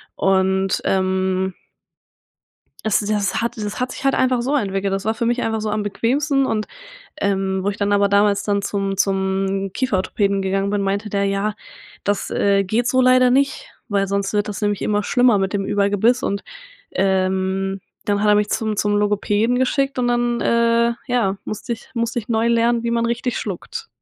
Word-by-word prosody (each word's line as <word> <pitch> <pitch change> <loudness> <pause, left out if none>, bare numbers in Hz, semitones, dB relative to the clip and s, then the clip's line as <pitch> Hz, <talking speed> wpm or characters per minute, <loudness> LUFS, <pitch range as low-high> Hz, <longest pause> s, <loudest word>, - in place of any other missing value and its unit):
und, 190 0 +1
ähm 190 0 0 1.3
es 220 - +2
das 210 0 -1
hat 235 - -2
das 210 +1 -4
hat 250 0 -2
sich - - -9
halt 270 - +3
einfach 255 -2 +2
so 280 +4 0
entwickelt. 195 -4 -1
Das 195 0 -3
war 220 +1 0
für 235 0 -2
mich 240 +1 0
einfach 220 -1 -1
so 215 0 -2
am 210 0 -1
bequemsten 270 +7 0
und, 215 -3 -1 0.5
ähm, 195 -1 0
wo 200 - -1
ich 200 - -2
dann 205 0 0
aber 200 0 +3
damals 200 0 +3
dann 200 -1 0
zum 195 -1 -2
zum 195 0 0
Kieferorthopäden 200 -4 0
gegangen 195 +1 0
bin, 205 - 0
meinte 200 +2 -2
der: 200 0 0
„Ja, 200 +2 -1 0.5
das, 205 0 -1
äh, 200 -1 +2
geht 230 +5 0
so 255 +1 +3
leider 255 0 +5
nicht, 275 +2 +1 0.2
weil 200 -2 +1
sonst 200 0 -1
wird 210 0 0
das 210 +1 -5
nämlich 205 -1 0
immer 210 0 +1
schlimmer 245 0 +3
mit 195 -1 -1
dem 200 -1 -1
Überbiss.“ 205 +5 +2
Und, 200 0 -2 0.5
ähm, 190 0 0 0.3
dann 205 0 +1
hat 210 - +2
er 210 - +6
mich 210 0 +2
zum 220 -2 -1
zum 205 0 +1
Logopäden 210 +3 +1
geschickt 275 +1 0
und 245 - +1
dann, 240 0 +1
äh, 235 0 +2
ja 235 -6 +1
musste 215 +3 -4
ich 225 - -17
musste 230 0 -1
ich 210 - -7
neu 230 0 +1
lernen, 235 0 +2
wie 235 - -1
man 235 0 +1
richtig 240 +1 -1
schluckt. 205 - -5
205 Hz, 190 wpm, -20 LUFS, 195-235 Hz, 1.3 s, er